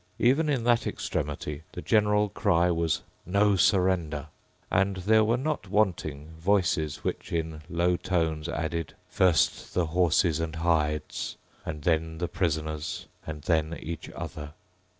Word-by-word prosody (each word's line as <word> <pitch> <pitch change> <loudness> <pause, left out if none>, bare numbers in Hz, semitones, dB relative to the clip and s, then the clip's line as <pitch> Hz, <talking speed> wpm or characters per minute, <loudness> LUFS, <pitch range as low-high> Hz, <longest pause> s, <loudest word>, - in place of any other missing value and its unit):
Even 140 +6 +3
in 135 -5 +1
that 120 0 +3
extremity 75 0 -3
the 90 - -6
general 105 -1 +3
cry 90 -4 +2
was 85 -2 0 0.2
"No 100 +3 +3
surrender." 90 -6 +2 0.4
And 95 +1 +2
there 110 +4 +4
were 115 +3 +2
not 135 -7 -2
wanting 85 -8 0
voices 80 -5 +1
which, - - -3
in 80 -2 -2
low 90 +1 +2
tones, 80 -4 -1
added, 85 -1 -3
"First 90 -4 +2
the 90 - +2
horses 85 0 +2
and 80 -1 -3
hides; 80 -2 0 0.3
and 75 -2 -5
then 80 -1 +1
the 85 +1 -1
prisoners; 80 0 -2 0.2
and 75 -2 -6
then 80 0 +1
each 85 0 -6
other." 75 0 -6
85 Hz, 135 wpm, -28 LUFS, 80-95 Hz, 0.4 s, there